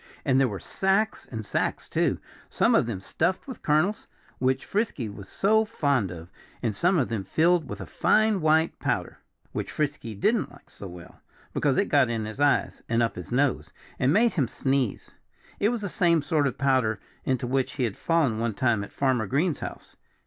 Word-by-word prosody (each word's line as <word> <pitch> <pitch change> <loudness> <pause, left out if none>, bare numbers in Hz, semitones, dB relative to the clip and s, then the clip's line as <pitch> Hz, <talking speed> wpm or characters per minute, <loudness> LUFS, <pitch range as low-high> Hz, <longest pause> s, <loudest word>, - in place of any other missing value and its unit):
And 130 -3 +3
there 135 - +4
were 100 -5 -5
sacks 195 +3 0
and 110 -3 -6
sacks - - -1
too - - +1 0.3
some - - +2
of - - +3
them 100 -6 -4
stuffed 175 - -1
with 260 - -8
kernels, 155 +8 +1 0.3
which 130 +1 +1
Frisky 200 - -1
was 100 -2 -10
so 220 +2 +3
fond 140 - 0
of, 85 +1 -9 0.3
and 110 -4 0
some 180 - +2
of 135 - +1
them 110 -4 -2
filled 165 - +2
with - - -6
a - - -5
fine 215 -3 +2
white 160 +1 +2
powder, - - -2 0.3
which - - -4
Frisky 145 -7 -3
didn't 215 - +1
like - - -18
so 100 - -9
well, 90 -1 -12 0.3
because - - +1
it - - +3
got - - +3
in 115 -2 -2
his 110 +5 -7
eyes, 145 -1 +2
and 115 0 +2
up 115 - -1
his - - -8
nose, 135 +2 +1 0.3
and 130 +2 +3
made 225 +7 +4
him 140 -8 +1
sneeze. 130 -2 -1 0.5
It 205 - +3
was 240 -2 -2
the 200 - -2
same 170 -4 +2
sort 145 -1 +1
of 130 - -4
powder 130 -6 +2 0.2
into 130 -1 0
which 130 +1 0
he 130 - -2
had 110 -5 -1
fallen 160 -10 +1
one 115 -2 -1
time 115 -4 +1
at 100 - -9
Farmer 130 -6 0
Green's 150 - 0
house. - - -8
135 Hz, 200 wpm, -26 LUFS, 115-170 Hz, 0.5 s, there